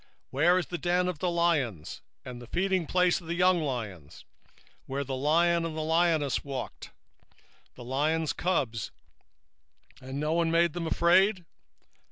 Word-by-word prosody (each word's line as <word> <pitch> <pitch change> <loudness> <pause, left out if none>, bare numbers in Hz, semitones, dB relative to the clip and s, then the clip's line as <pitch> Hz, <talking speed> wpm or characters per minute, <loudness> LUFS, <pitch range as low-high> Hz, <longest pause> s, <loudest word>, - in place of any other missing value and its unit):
2:11 - - -32 0.2
Where 170 +7 +3
is 180 - 0
the 175 - -5
dwelling 180 +1 +1
of 170 -5 -5
the 180 - 0
lions, 150 - -1 0.2
and 125 -1 -8
the 120 - -11
feedingplace 180 0 +1
of 165 - -14
the 170 - -2
young 180 -1 +3
lions, 110 - -6 0.6
where 140 +1 -2
the 135 -1 -4
lion, 170 +5 +2
even 165 -1 -4
the 160 - -3
old 155 - -4
lion, 165 -3 +2 0.2
walked, 135 -2 -6
and - - -35
the 125 - -10
lion's 150 +5 0
whelp, 165 -10 0 1.3
and 130 +2 -6
none 165 +2 +1
made 170 -1 +2
them 175 -2 -3
afraid? 180 +3 +3
165 Hz, 160 wpm, -28 LUFS, 135-175 Hz, 1.3 s, Where